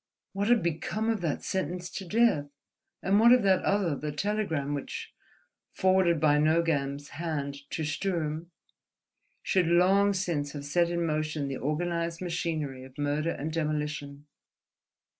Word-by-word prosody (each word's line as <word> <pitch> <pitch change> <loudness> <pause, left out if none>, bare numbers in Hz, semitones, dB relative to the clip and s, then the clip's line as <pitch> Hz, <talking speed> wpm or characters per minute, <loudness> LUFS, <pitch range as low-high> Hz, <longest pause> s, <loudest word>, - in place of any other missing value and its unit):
What 200 +1 -1
had 235 -5 +4
become 170 +6 -1
of 220 -4 -2
that 160 -4 -2
sentence 180 -1 -2
to 195 - -6
death? 205 -7 +2 0.6
And 195 +2 +3
what 235 +2 +7
of 250 -2 +6
that 190 -2 +4
other, 195 -7 +1
the 150 +2 -4
telegram 160 -5 -1
which, 140 -2 -5 0.6
forwarded 185 -3 +3
by 150 -1 +4
Nogam's 150 -3 +1
hand 145 -3 -3
to 160 - -3
Sturm, 160 0 -2 0.9
should 185 -4 +2
long 190 +4 +4
since 165 -7 -2
have 145 -1 -6
set 170 +4 +2
in 170 0 -1
motion 155 -2 -1
the 135 - -3
organized 170 +2 -2
machinery 160 -7 -3
of 130 0 -14
murder 145 +2 0
and 155 -1 -3
demolition? 150 -2 -3
165 Hz, 140 wpm, -29 LUFS, 145-185 Hz, 0.9 s, what